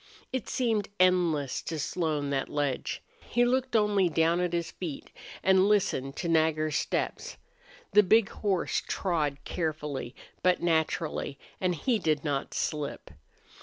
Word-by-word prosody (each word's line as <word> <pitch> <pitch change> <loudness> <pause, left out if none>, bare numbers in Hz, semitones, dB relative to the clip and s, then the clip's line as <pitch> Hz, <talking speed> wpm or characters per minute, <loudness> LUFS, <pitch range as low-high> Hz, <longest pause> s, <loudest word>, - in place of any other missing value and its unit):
It 260 -4 -3
seemed 225 -5 0
endless 175 -7 +2
to 165 - -4
Slone, 150 -2 -1
that 135 -1 -1
ledge. 145 -3 -2 0.2
He 240 +1 +1
looked 255 0 0
only 205 -4 +3
down 165 +2 +2
at 180 -1 0
his 170 -1 -2
feet 165 -7 -6 0.3
and 190 +1 +5
listened 140 -10 +1
to 175 - -3
Nagger's 155 -2 +2
steps. - - -2 0.5
The 210 - +7
big 210 +1 +4
horse 195 -4 0
trod 155 -7 0
carefully, 150 -6 -3 0.3
but 180 -1 +3
naturally, 160 -3 0 0.2
and 180 -2 +1
he 225 - +1
did 155 -5 0
not 145 -3 -2
slip. 150 -2 -3
170 Hz, 135 wpm, -29 LUFS, 150-190 Hz, 0.5 s, The